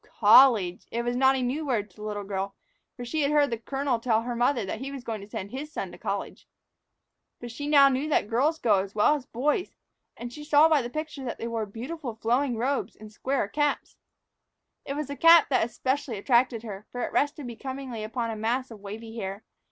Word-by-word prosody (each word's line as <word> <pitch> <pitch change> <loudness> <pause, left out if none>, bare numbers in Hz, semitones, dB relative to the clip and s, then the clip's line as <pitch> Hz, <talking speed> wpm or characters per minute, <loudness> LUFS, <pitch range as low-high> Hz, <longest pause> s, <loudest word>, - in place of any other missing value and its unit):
College! 210 -5 +6
It 235 +1 -2
was 240 0 -1
not 265 +1 +4
a 260 - -1
new 270 +6 -1
word 220 -8 -1
to - - -26
the - - -12
little 210 -1 -4
girl, 195 0 -4 0.4
for 245 - -6
she 305 +6 -1
had 280 - +2
heard 290 -3 +3
the 230 - -1
colonel 270 0 -1
tell 230 -1 +1
her 240 0 -3
mother 240 -2 +1
that 205 +3 -4
he 270 +2 -5
was 275 -3 -7
going 220 -3 -4
to 200 - -12
send 200 0 -6
his 290 +4 -6
son - - -5
to - - -11
college. - - -5 0.9
But 240 -1 -7
now 290 -1 +5
she 275 - +2
knew 275 +4 -1
that 290 - +2
girls 280 +8 +1
as 200 -2 +2
well 215 +7 +4
as 285 -4 -4
boys 295 +9 0
could - - -36
go. - - -26
And 240 0 -6
she 295 - -8
saw 295 +1 +5
by 310 -3 +3
the 240 - -5
picture 305 0 -5
that 240 - -4
they 230 - -4
wore 225 -2 -3
beautiful 245 +4 -6
flowing 240 +3 0
robes 265 +5 -1
and 215 0 -12
square 265 0 -1
caps. 295 +6 -1 0.9
It 275 - -4
was 300 +1 -2
the 285 - -4
cap 330 +2 +7
that 250 -4 +2
specially 260 0 -2
attracted 235 +2 +2
her, 210 -2 -8
for 245 - -5
it - - -3
rested 290 0 0
becomingly 255 -1 -6
upon 230 +1 -3
a - - -4
mass 240 +4 -1
of 220 - -10
wavy 220 +3 -8
hair. 195 +1 -5
245 Hz, 230 wpm, -27 LUFS, 220-280 Hz, 0.9 s, cap